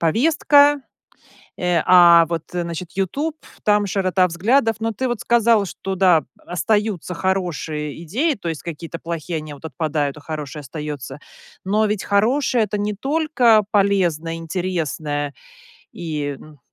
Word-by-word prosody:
повестка, 285 Hz, -, +4 dB, 0.8 s
э, 180 Hz, -1 st, +1 dB
а, 170 Hz, -2 st, +7 dB
вот 165 Hz, -2 st, -2 dB
значит, 170 Hz, -1 st, -4 dB
"Ютуб" 275 Hz, -, -2 dB
ф -, -, -19 dB
там 210 Hz, -1 st, +3 dB
широта 185 Hz, -1 st, +2 dB
взглядов. 225 Hz, +7 st, +2 dB
Но 225 Hz, 0 st, -1 dB
ты 255 Hz, +5 st, -2 dB
вот 240 Hz, -3 st, -3 dB
сказал, 230 Hz, -3 st, +3 dB
что 195 Hz, 0 st, -5 dB
да, 180 Hz, -6 st, +4 dB
остаются 200 Hz, 0 st, -1 dB
хорошие 165 Hz, -5 st, -2 dB
идеи, 275 Hz, -, 0 dB
то 195 Hz, -7 st, -6 dB
есть 160 Hz, -2 st, -4 dB
какие-то 165 Hz, 0 st, -7 dB
плохие, 165 Hz, 0 st, -4 dB
они 155 Hz, -1 st, -8 dB
вот 145 Hz, -, -17 dB
отпадают, 150 Hz, -1 st, -2 dB
а -, -, -13 dB
хорошее 150 Hz, 0 st, -6 dB
остается. 150 Hz, 0 st, -7 dB, 0.5 s
Но 210 Hz, +3 st, +2 dB
ведь 210 Hz, -1 st, -2 dB
хорошее- 235 Hz, +4 st, +2 dB
это 210 Hz, 0 st, -3 dB
не 205 Hz, +1 st, -1 dB
только 260 Hz, -3 st, +3 dB
полезное, 180 Hz, -6 st, +1 dB
интересное, 160 Hz, -4 st, -3 dB, 0.6 s
и 150 Hz, -4 st, -4 dB
н 155 Hz, -2 st, -15 dB
180 Hz, 140 wpm, -21 LUFS, 160-215 Hz, 0.8 s, а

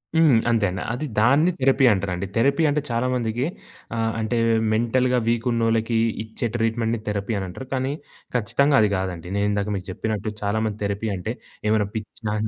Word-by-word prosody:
హ్మ్. 155 Hz, -7 st, +6 dB
అంతే 110 Hz, -3 st, +3 dB
అండి. 90 Hz, 0 st, -4 dB
అది 145 Hz, +5 st, -3 dB
దాన్ని 140 Hz, +10 st, +4 dB
థెరపీ 135 Hz, 0 st, +4 dB
అంటారండి. 95 Hz, -1 st, -1 dB
థెరపీ 140 Hz, +7 st, +3 dB
అంటే 150 Hz, +1 st, +1 dB
చాలా 120 Hz, +2 st, +1 dB
మందికి 120 Hz, +2 st, -1 dB, 0.5 s
ఆహ్, 115 Hz, 0 st, 0 dB
అంటే 110 Hz, +2 st, -1 dB, 0.4 s
మెంటల్‌గా 125 Hz, +3 st, +2 dB
వీకున్నోళ్ళకి 115 Hz, -1 st, +1 dB, 0.3 s
ఇచ్చే 110 Hz, +2 st, -4 dB
ట్రీట్‌మెంట్‌ని 115 Hz, 0 st, 0 dB
థెరపీ 100 Hz, +2 st, -2 dB
అని 95 Hz, -, -4 dB
అంటారు. 130 Hz, +8 st, -8 dB
కానీ 130 Hz, +1 st, -1 dB, 0.4 s
ఖచ్చితంగా 135 Hz, +5 st, +3 dB
అది 105 Hz, -, +4 dB
కాదండి. 90 Hz, -3 st, -4 dB
నేను 100 Hz, 0 st, +1 dB
ఇందాక 100 Hz, 0 st, -1 dB
మీకు 95 Hz, 0 st, -5 dB
చెప్పినట్టు 110 Hz, +1 st, -3 dB
చాలా 105 Hz, +2 st, 0 dB
మంది 105 Hz, -1 st, -3 dB
థెరపీ 100 Hz, +2 st, -2 dB
అంటే 90 Hz, -, -3 dB, 0.4 s
ఏమైనా 105 Hz, -2 st, +2 dB
పిచ్చా 105 Hz, 0 st, -5 dB
115 Hz, 165 wpm, -23 LUFS, 105-125 Hz, 0.5 s, హ్మ్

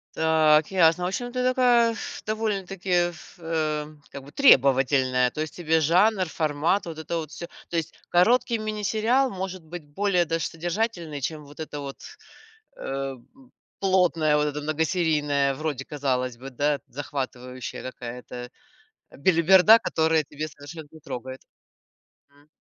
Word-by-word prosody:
Так, 155 Hz, 0 st, +3 dB
ясно. 180 Hz, -1 st, +3 dB
В -, -, +1 dB
общем, 245 Hz, +6 st, -4 dB
ты 250 Hz, 0 st, -2 dB
такая, 245 Hz, -2 st, +4 dB
пф, -, -, -7 dB
довольно-таки, 195 Hz, -4 st, -3 dB, 0.2 s
пф, 170 Hz, +1 st, -15 dB
эм, 155 Hz, -2 st, -3 dB
как 140 Hz, -, -8 dB
бы, 140 Hz, -, -14 dB
требовательная. 130 Hz, -, +4 dB
То 155 Hz, -, -9 dB
есть 155 Hz, -, -5 dB
тебе 160 Hz, -2 st, +1 dB
жанр, 185 Hz, +6 st, +3 dB
формат- 160 Hz, +5 st, 0 dB
вот 165 Hz, -2 st, -7 dB
это 165 Hz, +2 st, -4 dB
вот 155 Hz, -2 st, -5 dB
всё. 170 Hz, -, -7 dB, 0.2 s
То 170 Hz, -, -2 dB
есть 160 Hz, -, -3 dB, 0.2 s
короткий 230 Hz, +6 st, +3 dB
мини-сериал 215 Hz, +5 st, +1 dB
может 185 Hz, -2 st, -5 dB
быть 165 Hz, 0 st, -8 dB
более 195 Hz, -3 st, +2 dB
даже 165 Hz, 0 st, -1 dB
содержательный, 170 Hz, -3 st, -3 dB
чем 150 Hz, +1 st, -4 dB
вот 145 Hz, +2 st, -16 dB
эта 150 Hz, -2 st, -6 dB
вот, 140 Hz, -1 st, -8 dB, 0.8 s
э, 135 Hz, 0 st, -4 dB
п 255 Hz, -, -22 dB, 0.3 s
плотная, 180 Hz, -5 st, +2 dB
вот 150 Hz, -, +1 dB
эта 150 Hz, -, -4 dB
многосерийная, 150 Hz, -3 st, +1 dB
вроде, 145 Hz, -3 st, -4 dB
казалось 130 Hz, -4 st, -2 dB
бы, 135 Hz, +2 st, -8 dB
да, 145 Hz, +3 st, 0 dB
захватывающая 130 Hz, -2 st, -6 dB
какая-то, 125 Hz, -1 st, -8 dB, 0.8 s
э, -, -, -16 dB
белиберда, 185 Hz, +7 st, +6 dB
которая 160 Hz, -1 st, +1 dB
тебя 150 Hz, +2 st, -6 dB
совершенно 150 Hz, +2 st, -10 dB
не 160 Hz, -, -14 dB
трогает. 130 Hz, -1 st, -7 dB, 0.9 s
М. 145 Hz, +1 st, -25 dB
160 Hz, 145 wpm, -25 LUFS, 145-185 Hz, 0.9 s, белиберда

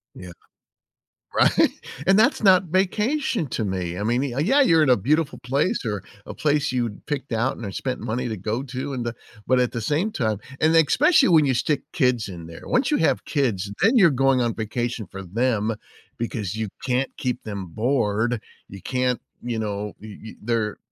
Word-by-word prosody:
Yeah. 90 Hz, -1 st, -9 dB, 1.0 s
Right? -, -, +4 dB, 0.4 s
And 195 Hz, +1 st, +6 dB
that's 220 Hz, -, +3 dB
not 190 Hz, -3 st, +6 dB
vacation 210 Hz, -, 0 dB
to 115 Hz, -, -2 dB
me. 90 Hz, -3 st, -3 dB
I -, -, -2 dB
mean, 120 Hz, +5 st, 0 dB
y 125 Hz, -, -3 dB
yeah, 265 Hz, -, +4 dB
you're 165 Hz, -, +5 dB
in 150 Hz, -, +3 dB
a 125 Hz, -, +6 dB
beautiful 150 Hz, -, 0 dB
place 140 Hz, -, 0 dB
or 105 Hz, -3 st, -2 dB, 0.2 s
a -, -, -7 dB
place 150 Hz, -2 st, +1 dB
you'd 120 Hz, -5 st, -3 dB
picked 140 Hz, -3 st, -4 dB
out 120 Hz, +3 st, 0 dB
and 100 Hz, -5 st, -7 dB
spent 130 Hz, -1 st, -3 dB
money 125 Hz, +3 st, -3 dB
to 110 Hz, -, -3 dB
go 110 Hz, +4 st, -3 dB
to 135 Hz, +1 st, -5 dB
and 125 Hz, -2 st, -3 dB
the 120 Hz, 0 st, -3 dB, 0.3 s
but 130 Hz, 0 st, +3 dB
at 125 Hz, -1 st, +1 dB
the 120 Hz, -, -3 dB
same 155 Hz, -, 0 dB
time 110 Hz, -, -1 dB, 0.2 s
and 160 Hz, +1 st, +3 dB
especially 270 Hz, -, +5 dB
when 160 Hz, -4 st, +5 dB
you 135 Hz, -, +2 dB
stick 140 Hz, +4 st, 0 dB
kids 125 Hz, -6 st, +1 dB
in 85 Hz, -3 st, -8 dB
there. 85 Hz, 0 st, -11 dB
Once 255 Hz, +1 st, +1 dB
you 300 Hz, -, +2 dB
have 160 Hz, -, +1 dB
kids, 110 Hz, -, -1 dB
then 225 Hz, +6 st, +5 dB
you're 195 Hz, -8 st, +7 dB
going 135 Hz, -2 st, +2 dB
on 120 Hz, -2 st, 0 dB
vacation 115 Hz, +1 st, -3 dB
for 95 Hz, -, -9 dB
them 110 Hz, +3 st, 0 dB, 0.4 s
because 110 Hz, -4 st, -3 dB
you 110 Hz, 0 st, -2 dB, 0.2 s
can't 130 Hz, +1 st, -1 dB
keep 125 Hz, -1 st, -3 dB
them 100 Hz, -3 st, -5 dB
bored. 115 Hz, +1 st, 0 dB, 0.3 s
You 95 Hz, -1 st, -11 dB
can't 125 Hz, +3 st, -1 dB, 0.2 s
you 120 Hz, -2 st, -2 dB
know, 105 Hz, -1 st, -3 dB
y 105 Hz, -1 st, -10 dB
y 110 Hz, -, -8 dB
they're 110 Hz, -1 st, -1 dB
125 Hz, 195 wpm, -23 LUFS, 110-150 Hz, 1.0 s, you're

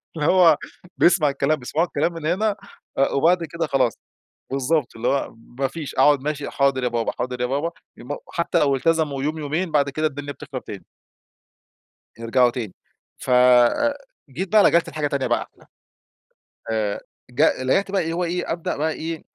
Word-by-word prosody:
فاللي 150 Hz, -2 st, -1 dB
هو 175 Hz, -5 st, +6 dB, 0.4 s
بيسمع 170 Hz, -4 st, +4 dB
الكلام 140 Hz, +2 st, +1 dB
بيسمعوا 155 Hz, +7 st, -1 dB
الكلام 170 Hz, -, -1 dB
من 165 Hz, -2 st, -7 dB
هنا 200 Hz, +6 st, +1 dB, 0.6 s
وبعد 170 Hz, +5 st, +3 dB
كده 165 Hz, 0 st, -3 dB
خلاص، 130 Hz, -4 st, +1 dB, 0.6 s
بالضبط. 135 Hz, +1 st, 0 dB
اللي 115 Hz, +2 st, -3 dB
هو 140 Hz, -4 st, -1 dB, 0.2 s
ما 135 Hz, -, +2 dB
فيش 150 Hz, -1 st, -7 dB
أقعد، 140 Hz, 0 st, +4 dB
ماشي 150 Hz, 0 st, -3 dB
حاضر 140 Hz, -2 st, +1 dB
يا -, -, +2 dB
بابا، 120 Hz, -1 st, -1 dB
حاضر 125 Hz, 0 st, -3 dB
يا -, -, +2 dB
بابا، 145 Hz, +7 st, -1 dB, 0.3 s
يوم 145 Hz, +4 st, -6 dB, 0.2 s
حتى 170 Hz, 0 st, 0 dB
لو 140 Hz, -3 st, +3 dB
التزموا 150 Hz, -1 st, 0 dB
يوم، 155 Hz, +2 st, -1 dB
يومين، 155 Hz, +4 st, -2 dB
بعد 140 Hz, -2 st, +2 dB
كده 155 Hz, +3 st, 0 dB
الدنيا 145 Hz, -1 st, -6 dB
بتخرب -, -, -8 dB
تاني -, -, -9 dB, 1.3 s
يرجعوا 120 Hz, +2 st, +3 dB
تاني. 115 Hz, -6 st, -5 dB, 0.4 s
ف -, -, -8 dB
آآ 125 Hz, -, +4 dB, 0.3 s
جيت 165 Hz, +9 st, -4 dB
بقى 215 Hz, -1 st, +6 dB
لجأت 170 Hz, 0 st, +3 dB
لحاجة 150 Hz, -2 st, -2 dB
تانية 140 Hz, -2 st, -1 dB
بقى -, -, +1 dB
أحلى. -, -, -23 dB, 1.1 s
آآ 105 Hz, -2 st, -1 dB, 0.3 s
جأ 125 Hz, +1 st, +2 dB
لجأت 195 Hz, +10 st, +1 dB
بقى 195 Hz, -1 st, +1 dB
اللي 165 Hz, +1 st, -3 dB
هو 175 Hz, +2 st, -1 dB
إيه، 175 Hz, +1 st, -2 dB
أبدأ 165 Hz, 0 st, -3 dB
بقى 155 Hz, +2 st, 0 dB
إيه، 160 Hz, 0 st, -5 dB
145 Hz, 175 wpm, -22 LUFS, 130-165 Hz, 1.3 s, هو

